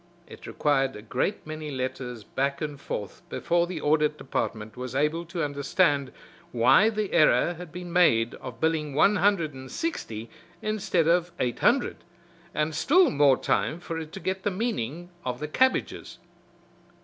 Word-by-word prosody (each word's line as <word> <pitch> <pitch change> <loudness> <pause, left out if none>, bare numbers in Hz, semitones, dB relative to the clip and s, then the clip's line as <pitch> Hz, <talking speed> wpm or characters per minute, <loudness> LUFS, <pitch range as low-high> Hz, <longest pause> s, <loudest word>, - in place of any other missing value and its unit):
It - - -12
required 135 -2 +1
a 105 - -9
great 125 - -2
many 155 0 -6
letters 130 -3 -4
back 140 +4 -2
and 145 -2 -5
forth 105 -7 -5
before 170 0 +1
the 175 -3 -5
Audit 150 0 +2
Department 110 -4 -3
was 125 0 -6
able 150 +4 0
to 170 -1 -3
understand 145 0 +1 0.4
why 130 - +5
the 215 -2 -3
error 155 0 +4
had 175 -1 -10
been 175 -1 -7
made 120 -11 +4
of 120 -2 -8
billing 155 -3 0
one 195 +7 +4
hundred 190 -8 +2
and 130 0 -10
sixty 115 - -4 0.3
instead 195 -6 0
of 175 +1 +2
eight 120 -2 -1
hundred, 245 +1 +2 0.5
and 150 0 -1
still 330 - +4
more 140 -2 +4
time 160 - 0
for 165 -2 -5
it 160 -1 -7
to - - -6
get 190 0 -2
the 205 - 0
meaning 180 - -3
of 125 -1 -3
the 150 - -3
"cabbages." 260 +12 0
155 Hz, 160 wpm, -27 LUFS, 135-180 Hz, 0.5 s, why